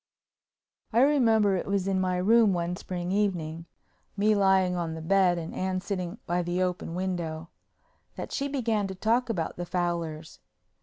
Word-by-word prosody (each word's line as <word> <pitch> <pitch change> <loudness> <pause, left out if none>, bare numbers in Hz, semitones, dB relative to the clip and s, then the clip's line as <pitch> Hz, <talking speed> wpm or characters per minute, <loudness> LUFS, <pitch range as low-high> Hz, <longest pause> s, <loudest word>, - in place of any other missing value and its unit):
I 235 +2 +4
remember 225 -8 +4
it 185 - -3
was 195 -1 0
in 190 -1 +1
my 185 -1 0
room 215 +2 +4
one 175 0 -1
spring 180 -1 -5
evening—me 195 +2 -2
lying 190 -2 +3
on 165 -2 -3
the - - -6
bed 185 0 +3
and 165 -1 -5
Anne 185 0 -1
sitting 190 -1 -4
by 175 +1 0
the 175 +1 -2
open 180 -2 -3
window—that 170 -3 -7
she 280 - -1
began 230 -7 0
to 190 - -6
talk 235 +5 +1
about 170 -8 -2
the 175 - -4
Fowlers. 170 -3 -3
185 Hz, 155 wpm, -27 LUFS, 175-205 Hz, -, I